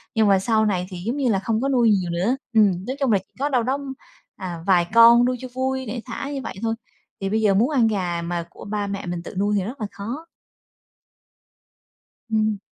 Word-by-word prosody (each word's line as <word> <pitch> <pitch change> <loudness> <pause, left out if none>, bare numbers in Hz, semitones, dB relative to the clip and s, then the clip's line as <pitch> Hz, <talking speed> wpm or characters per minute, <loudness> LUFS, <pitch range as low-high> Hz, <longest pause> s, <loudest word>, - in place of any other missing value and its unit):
Nhưng 220 -1 +4
mà 195 -1 +5
sau 220 +2 +2
này 185 -4 0
thì 185 - -7
giống 240 +5 -1
như 270 -4 +1
là 200 -4 +2
không 220 +3 -1
có 275 - 0
nuôi 245 -4 +4
nhiều 190 -4 +2
nữa. 185 +9 +1 0.2
Ừm, 195 -4 +3
nói 260 - -2
chung 270 -4 +2
là 205 - +5
chỉ 190 - -23
có 285 +2 0
đâu 250 -4 +2
đó, 260 +4 0 0.6
à, 175 -3 -6
vài 175 -3 +4
con 235 +1 +8
nuôi 250 0 0
cho 255 - -6
vui, 260 0 -1
để 235 +1 -4
thả 255 +3 -5
như 275 - -3
vậy - - -6
thôi. 225 0 0 0.5
Thì 195 - -1
bây 220 +2 +1
giờ 210 -2 +4
muốn 220 +7 +3
ăn 255 -7 +3
gà 180 -5 -1
mà 170 0 -3
của - - -12
ba 205 -1 -2
mẹ 200 -2 -4
mình 175 -1 -4
tự - - -9
nuôi 205 +1 +1
thì 195 - 0
rất 235 +5 -7
là 210 - -1
khó. 240 +11 -6 2.0
Ừm. 215 -1 +1
215 Hz, 235 wpm, -23 LUFS, 195-245 Hz, 2.0 s, con